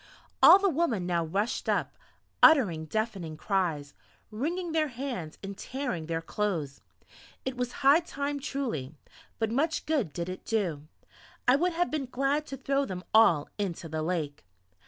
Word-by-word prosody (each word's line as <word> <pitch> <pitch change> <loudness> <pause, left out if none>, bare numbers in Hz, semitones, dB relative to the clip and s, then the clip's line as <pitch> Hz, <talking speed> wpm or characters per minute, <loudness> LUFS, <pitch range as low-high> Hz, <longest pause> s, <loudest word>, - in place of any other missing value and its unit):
All - - +10
the 400 0 +1
women 280 - 0
now 175 -1 +1
rushed 195 +8 -2
up, - - 0 0.5
uttering 200 - +6
deafening 195 -5 -3
cries, 160 -6 -1 0.4
wringing 335 +10 -2
their 315 -1 +2
hands 245 - -5
and 195 0 -6
tearing 205 - -4
their 165 0 -2
clothing. 165 -8 -2 0.7
It 260 -1 -2
was 250 -1 -2
high 285 +4 +8
time 285 -4 -4
truly! 240 - -3 0.4
but 225 -1 -1
much 310 +7 0
good 280 - 0
did 170 +3 -4
it 185 0 -6
do! 170 -10 -2 0.6
I 250 - +7
would 350 +5 +1
have 350 +2 0
been 295 -4 -2
glad 275 +4 0
to 270 - -6
throw 275 +2 0
them 185 -7 -5
all 195 -10 +5
into 180 -4 -3
the 155 0 -3
lake.... 155 -4 -3
220 Hz, 155 wpm, -29 LUFS, 170-280 Hz, 0.7 s, All